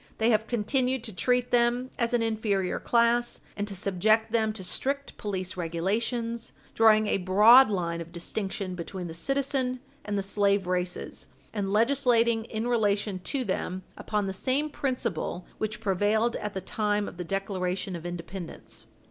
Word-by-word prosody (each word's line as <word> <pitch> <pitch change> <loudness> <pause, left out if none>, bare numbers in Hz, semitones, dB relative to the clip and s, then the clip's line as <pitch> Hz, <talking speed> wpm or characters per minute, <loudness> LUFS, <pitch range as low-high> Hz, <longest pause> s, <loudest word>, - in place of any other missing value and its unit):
They 225 +2 +3
have 220 0 +2
continued 250 +2 0
to 220 -5 -7
treat 245 +4 +1
them 245 +1 +2
as 235 -1 +1
an 240 -2 +2
inferior 215 -4 0
class, 240 0 +2 0.2
and 205 0 -3
to 200 - -5
subject 215 +4 +2
them 220 -2 +2
to 205 -3 -7
strict 280 +9 -2
police 190 -4 -3
regulations, 220 +7 -2 0.2
drawing 215 -1 +5
a 205 - +1
broad 215 +7 +7
line 170 -4 -1
of 170 0 -9
distinction 190 +2 -4
between 180 +1 -6
the 165 - -6
citizen 265 - -1 0.2
and 205 -1 -2
the 200 - 0
slave 200 0 +2
races, 180 0 -2 0.3
and 200 -3 -2
legislating 235 -1 +3
in 225 +1 -3
relation 205 -4 +1
to 265 +8 -2
them 185 -3 -3
upon 210 -2 -2
the 190 - -2
same 275 +9 0
principle 235 - -2
which 215 0 -2
prevailed 215 +3 +1
at 210 -1 -5
the 190 - -2
time 210 0 0
of - - -9
the 180 - -3
Declaration 190 0 -2
of 165 - -7
Independence. 170 - -6
210 Hz, 160 wpm, -28 LUFS, 185-235 Hz, 0.3 s, broad